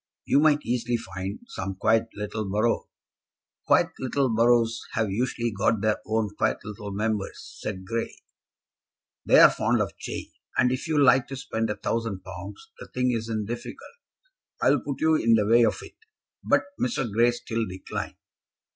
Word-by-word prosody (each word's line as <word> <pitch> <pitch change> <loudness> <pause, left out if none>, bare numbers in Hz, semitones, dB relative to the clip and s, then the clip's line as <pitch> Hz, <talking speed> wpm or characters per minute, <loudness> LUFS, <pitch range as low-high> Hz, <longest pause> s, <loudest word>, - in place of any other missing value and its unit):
"You - - +4
might 150 -1 +4
easily 120 0 0
find 95 -2 -6
some 95 0 -5
quiet 110 +3 +2
little 105 0 -4
borough." 110 +4 0 0.8
"Quiet - - +4
little 130 +1 0
boroughs 115 0 +3
have 110 -3 0
usually 120 +2 -1
got 105 +1 +1
their 110 0 +1
own 110 -2 0
quiet - - +1
little 105 0 -7
Members," 105 0 -3
said 95 -3 -5
Grey. 115 +4 -3 1.1
"They're - - +8
fond - - +1
of - - -2
change; - - -6 0.3
and 125 - +4
if 130 +5 -3
you 155 -2 0
like 130 -2 +5
to 135 - -6
spend 115 -4 -3
a 105 - -1
thousand 115 -5 -3
pounds, 95 +2 -9
the - - -9
thing 125 0 0
isn't 110 -2 -2
difficult. 120 - -8 0.6
I'll - - +4
put 140 -2 -5
you 160 0 +4
in 115 -7 +4
the 105 -2 +2
way 115 +3 +5
of - - +2
it." - - -13 0.5
But - - +3 0.2
Mr. 125 0 0
Grey 115 +3 +3
still 115 -2 -3
declined. 95 0 -6
115 Hz, 165 wpm, -26 LUFS, 105-120 Hz, 1.1 s, They're